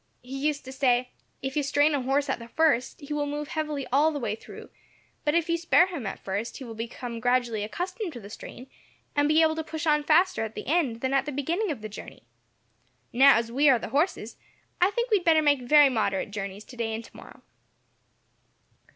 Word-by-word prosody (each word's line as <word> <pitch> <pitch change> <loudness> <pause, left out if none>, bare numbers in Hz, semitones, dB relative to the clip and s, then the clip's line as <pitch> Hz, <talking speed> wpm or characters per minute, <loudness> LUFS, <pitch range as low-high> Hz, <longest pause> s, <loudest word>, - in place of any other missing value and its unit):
He 270 +3 -3
used 290 -3 -2
to 260 - -8
say, 250 -2 +1 0.3
'If 265 0 -3
you 300 - +2
strain 290 +2 +2
a 285 - 0
horse 275 +3 0
at 265 - -2
the 230 - -10
first, 295 0 +1
he 290 +1 -6
will 295 -1 -1
move 295 +1 -4
heavily 305 -4 -3
all 295 +4 +5
the 300 - -4
way 240 -6 -2
through, 220 - -11 0.5
but 295 +1 +1
if 335 -1 +2
you 335 0 +1
spare 340 +1 +4
him 335 - -5
at 195 - -5
first, 200 +4 -4
he 270 - -8
will 235 -3 -8
become 235 +1 -6
gradually 240 -3 +1
accustomed 365 - -4
to 240 - -8
the 200 - -11
strain, 245 +2 -10 0.5
and 290 0 +3
be 310 +2 +4
able 315 0 +2
to 320 - -3
push 315 +1 -5
on 300 -1 +3
faster 345 -1 +3
at 220 0 -6
the - - -6
end 275 -7 0
than 260 +1 -1
at 275 +2 +1
the - - -2
beginning 335 +10 -1
of 285 -8 -4
the - - -3
journey!' 210 - -11 0.9
Now, 270 +3 +7
as 230 0 -2
we 285 +4 +4
are 260 - +6
the - - -6
horses, 280 - -1 0.4
I 365 - +5
think 475 +3 -2
we 425 - +6
had 360 - -7
better 320 -2 +5
make 285 -3 +3
very 290 +3 +6
moderate 205 -5 -1
journeys 200 0 -6
today 230 -3 -4
and 225 - -6
tomorrow." - - -15
280 Hz, 220 wpm, -26 LUFS, 235-310 Hz, 0.9 s, Now